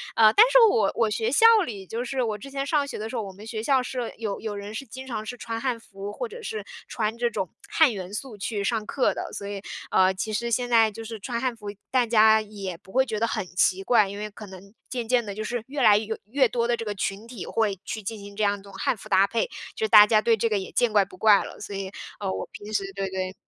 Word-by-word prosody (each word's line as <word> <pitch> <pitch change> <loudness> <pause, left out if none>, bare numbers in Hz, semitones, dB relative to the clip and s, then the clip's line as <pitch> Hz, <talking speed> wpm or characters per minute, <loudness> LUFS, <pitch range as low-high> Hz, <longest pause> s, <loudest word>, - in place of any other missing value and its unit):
呃， 215 -1 +6
但 435 - +8
是 - - +6
我 450 - +3
我 225 -2 +2
学 225 +2 -1
校 450 +11 +5 0.2
里， 200 -4 -7
就 230 +6 -4
是 260 +1 -2
我 215 -2 -2
之 275 +7 -10
前 275 0 -3
上 285 -1 +1
学 - - -6
的 215 +1 -5
时 250 - -6
候， - - -1
我 195 -1 -8
们 205 +3 -12
学 220 -1 -4
校 260 +1 +2
是 250 -2 -4
有 215 -3 -3
有 215 -2 -5
人 205 +1 -7
是 275 - -5
经 260 +2 -9
常 225 -4 -5
是 245 - -5
穿 230 -1 -5
汉 250 -2 -1
服、 200 -1 -8
或 - - -4
者 475 +2 -9
是 445 -1 -5 0.2
穿 220 0 -2
这 240 0 +1
种 200 -6 -3 0.2
汉 305 -8 +4
元 190 -1 -7
素 225 0 -6
去 205 +1 -3
上 215 +1 -1
课 260 +4 +1
的。 - - -5
所 200 - -6
以， 200 -1 -5 0.3
呃， 190 0 +4
其 215 +3 -4
实 235 +3 -1
现 245 +1 0
在 225 -2 +5
就 225 +2 -9
是 225 -1 -7
穿 235 +4 -3
汉 255 -2 0
服， 210 -2 -11 0.2
大 255 -2 +3
家 220 -1 +6
也 200 -5 -7
不 190 0 -18
会 265 +1 +4
觉 220 -4 -3
得 230 - +1
很 215 -5 -2
奇 190 0 +3
怪。 215 -4 +4
因 200 - -7
为 210 +1 -5
可 210 0 -11
能 190 +1 -13 0.2
渐 245 -2 -3
渐 245 -2 +2
地 200 - -6
就 215 - -4
是 240 +2 -3
越 275 0 -3
来 210 -3 +7
哟 220 +1 -3
越 260 +6 +2
多 235 +1 -1
的 240 -1 +1
这 230 - -5
个 210 -1 -3
群 195 +3 -3
体 235 -6 -7
会 210 -4 0
去 220 - -5
进 220 +3 -5
行 200 0 -10
这 215 - -1
样 200 0 +1
一 - - -14
种 200 0 -14
汉 195 +5 0
服 - - -13
搭 195 +1 +5
配， 230 - 0 0.3
就 445 - -4
是 435 - -3
大 210 0 +9
家 215 -1 +4
对 230 0 +3
这 230 - +1
个 215 -2 +1
也 190 - -5
见 240 -3 +1
怪 205 - +5
不 190 -1 -13
怪 210 0 +5
了。 - - -10
所 200 - -7
以， 195 -1 -5 0.3
呃， 190 -1 -1
我 - - -4
平 205 +1 -9
时 200 - +1
对 195 -1 -2
对 185 0 -3
220 Hz, 305 characters per minute, -25 LUFS, 200-240 Hz, 0.3 s, 大